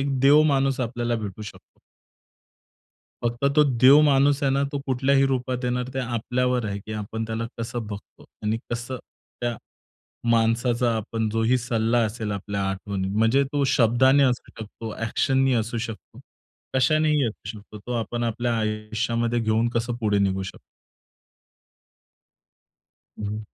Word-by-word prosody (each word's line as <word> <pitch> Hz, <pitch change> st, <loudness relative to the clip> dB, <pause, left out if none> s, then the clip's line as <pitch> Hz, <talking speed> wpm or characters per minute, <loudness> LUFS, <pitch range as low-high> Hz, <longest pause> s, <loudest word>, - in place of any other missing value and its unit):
एक 135 Hz, -1 st, -1 dB
देव 145 Hz, +3 st, +6 dB
माणूस 135 Hz, -3 st, +2 dB
आपल्याला 120 Hz, -1 st, -1 dB
भेटू 105 Hz, -1 st, -6 dB
शकतो. 105 Hz, -, -12 dB, 1.5 s
फक्त 120 Hz, +3 st, -1 dB
तो 150 Hz, -, +7 dB, 0.2 s
देवमाणूस 140 Hz, +2 st, +5 dB
आहे 140 Hz, -, +3 dB
ना, 140 Hz, +1 st, +1 dB
तो 145 Hz, -, -1 dB
कुठल्याही 135 Hz, +1 st, +2 dB
रूपात 125 Hz, -1 st, -2 dB
येणार, 125 Hz, 0 st, -1 dB
ते -, -, -2 dB
आपल्यावर 125 Hz, 0 st, -1 dB
आहे 100 Hz, -1 st, -3 dB
की 110 Hz, +2 st, -9 dB
आपण 110 Hz, +1 st, -4 dB
त्याला 115 Hz, +1 st, -3 dB
कसं 115 Hz, -1 st, -4 dB
बघतो. 105 Hz, -1 st, -10 dB, 0.2 s
आणि 110 Hz, +2 st, 0 dB
कसं 120 Hz, +2 st, -4 dB, 0.4 s
त्या 120 Hz, -2 st, -1 dB, 0.7 s
माणसाचा 115 Hz, +1 st, +2 dB
आपण 110 Hz, 0 st, -2 dB
जोही 115 Hz, +3 st, +2 dB
सल्ला 115 Hz, 0 st, 0 dB
असेल 110 Hz, 0 st, -4 dB
आपल्या 100 Hz, 0 st, -3 dB
आठवणीत, 95 Hz, 0 st, -3 dB
म्हणजे 115 Hz, +6 st, +3 dB
तो 145 Hz, -1 st, +1 dB
शब्दाने 130 Hz, +4 st, +4 dB
असू 125 Hz, -2 st, +1 dB
शकतो, 110 Hz, 0 st, -7 dB
एक्शन 130 Hz, +4 st, +1 dB
नी 130 Hz, -, +3 dB
असू 115 Hz, 0 st, -1 dB
शकतो, 115 Hz, -1 st, -7 dB, 0.5 s
कशानेही 150 Hz, +1 st, +3 dB
असू 110 Hz, -, -7 dB
शकतो, 105 Hz, 0 st, -11 dB
तो 115 Hz, +5 st, -7 dB
आपण 120 Hz, +1 st, -4 dB
आपल्या 120 Hz, 0 st, -1 dB
आयुष्यामध्ये 110 Hz, +2 st, -1 dB
घेऊन 110 Hz, +1 st, +1 dB
कसं 115 Hz, +1 st, -1 dB
पुढे 105 Hz, -2 st, +2 dB
निघू 95 Hz, -1 st, +1 dB
शकतो. 95 Hz, -, -8 dB, 2.6 s
हं. 105 Hz, 0 st, -3 dB
120 Hz, 140 wpm, -24 LUFS, 110-130 Hz, 2.6 s, तो